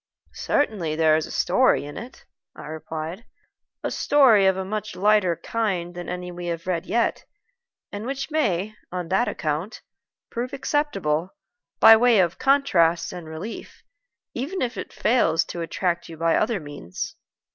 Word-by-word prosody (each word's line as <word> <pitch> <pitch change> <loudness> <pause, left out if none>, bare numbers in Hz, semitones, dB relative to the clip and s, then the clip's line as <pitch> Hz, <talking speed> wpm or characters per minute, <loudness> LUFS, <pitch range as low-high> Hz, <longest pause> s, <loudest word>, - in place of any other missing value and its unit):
"Certainly 195 - 0
there 160 -1 +4
is 155 - -1
a - - -10
story 220 - +2
in 145 - -8
it," 245 +3 -10 0.3
I - - -10
replied 160 +5 -6 0.6
"a - - -2
story 240 -9 +5
of 190 0 +3
a 190 - -3
much 215 +2 -4
lighter 205 -3 +3
kind 185 -5 -2
than 175 0 -7
any 180 0 -5
we 175 0 -7
have 170 -1 -4
yet - - -4 0.3
read, 235 - +1 0.7
and 205 +3 -5
which 275 +3 -4
may, 210 - 0 0.2
on 180 -2 -4
that 190 +6 +2
account, 155 +7 -3 0.5
prove 245 +3 -4
acceptable, 195 - -1 0.4
by 225 0 +10
way 240 0 +4
of 175 -1 +1
contrast 175 -13 +3
and 175 -3 -8
relief, 160 +8 -8 0.5
even 290 +9 -3
if 245 0 -2
it - - -6
fails 210 -9 +2
to 170 - -6
attract 170 +1 -2
you 165 - -9
by 165 0 +2
other 220 -2 +1
means. 145 - -7
185 Hz, 155 wpm, -24 LUFS, 165-230 Hz, 0.7 s, by